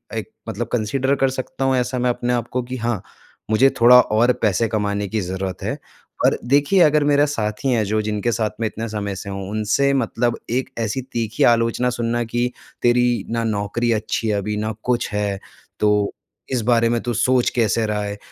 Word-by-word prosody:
एक - - -4 0.2
मतलब - - -3
कंसिडर 130 +4 0
कर 135 -1 +2
सकता 130 0 -4
हूँ, 135 0 +2
ऐसा 125 0 -1
मैं 125 0 +1
अपने 120 0 -1
आप 120 -1 -1
को 125 - 0
कि 125 +1 -6
हाँ, 115 -3 -2 0.5
मुझे 130 +5 +5
थोड़ा 125 +1 +9
और 120 +4 +2
पैसे 110 +1 +2
कमाने 105 -2 -1
की 110 +1 -2
ज़रूरत 95 +1 -4
है। - - -2 0.5
और - - +3
देखिए 145 +8 +3
अगर 150 -2 +5
मेरा 145 0 +4
साथी 115 -2 -2
हैं, 115 -4 +2
जो 110 +2 0
जिनके 105 +2 -1
साथ 110 -2 0
मैं 110 - 0
इतने 115 +2 -5
समय 100 -2 -3
से 100 +1 -7
हूँ, 95 0 -5
उनसे 110 +6 +1
मतलब 120 -2 0
एक 130 +2 -1
ऐसी 115 +3 -1
तीखी 115 -3 -2
आलोचना 115 +1 +3
सुनना 120 0 -1
कि 120 +2 -1 0.3
तेरी 120 0 +2
ना 115 0 -1
नौकरी 110 +2 -1
अच्छी 110 +1 -2
है 105 - +1
अभी, 105 +1 -2
ना 110 +1 -2
कुछ 125 -1 0
है, 100 -1 -1 0.4
तो 105 -1 +2 0.4
इस 125 -3 0
बारे 115 0 +3
में 120 -1 0
तू 120 - -2
सोच 125 +2 +2
कैसे 115 -1 +2
रहा 105 -1 -1
है। 100 0 -4
115 Hz, 200 wpm, -21 LUFS, 105-125 Hz, 0.5 s, थोड़ा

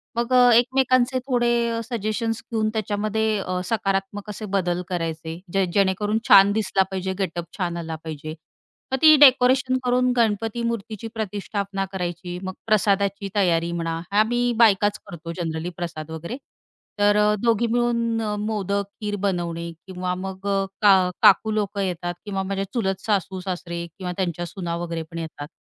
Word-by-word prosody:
मग 235 +2 -1
अ, 250 -1 +7
एकमेकांचे 255 +1 +3
थोडे 240 -2 +1
सजेशन्स 225 0 -2
घेऊन 220 -1 +1
त्याच्यामध्ये 215 0 0
अ, 185 -1 -2
सकारात्मक 195 0 -2
असे 210 +1 -6
बदल 180 -2 0
करायचे 165 -2 -4
जे 195 -1 +3
जेणेकरून 200 +2 +2
छान 195 +1 +8
दिसला 200 -2 +1
पाहिजे 190 0 -2
गेटअप 175 -3 -2
छान 175 -3 -2
आला 165 -1 -4
पाहिजे. 155 -1 -6 0.6
मग - - +3
ती 310 -1 +9
डेकोरेशन 260 -1 +5
करून 250 0 +2
गणपती 225 0 +1
मूर्तीची 225 -2 -4
प्रतिष्ठापना 200 -2 -3
करायची 175 -1 -4
मग 190 0 -4
प्रसादाची 200 -1 +1
तयारी 170 -4 +2
म्हणा, 165 -1 -3 0.2
आम्ही 240 +3 +2
बायकाच 205 -3 +4
करतो 165 -1 -7
जनरली 165 -1 -3
प्रसाद 160 -3 -5
वगैरे. 170 +9 -6 0.6
तर 205 0 +4
अ, 210 0 +4
दोघी 235 0 +2
मिळून 235 -1 0
अ, 210 -1 -2
मोदक, 200 -2 -1 0.2
खीर 205 -1 -2
बनवणे 170 -3 -2 0.2
किंवा 180 -1 -3
मग 190 +1 -6
अ, 195 -1 +1 0.2
का 190 -3 +5
काकू 210 +3 +6
लोकं 205 -1 -1
येतात 175 -2 -2
किंवा 195 -2 -2
माझ्या 195 0 -2
चुलत 195 -6 -1
सासू-सासरे 185 -3 -2
किंवा 185 -2 -4
त्यांच्या 175 -2 -2
सुना 170 -1 -4
वगैरे 170 -1 -4
पण 165 - -7
येतात. 155 -3 -7
200 Hz, 150 wpm, -23 LUFS, 180-225 Hz, 0.6 s, ती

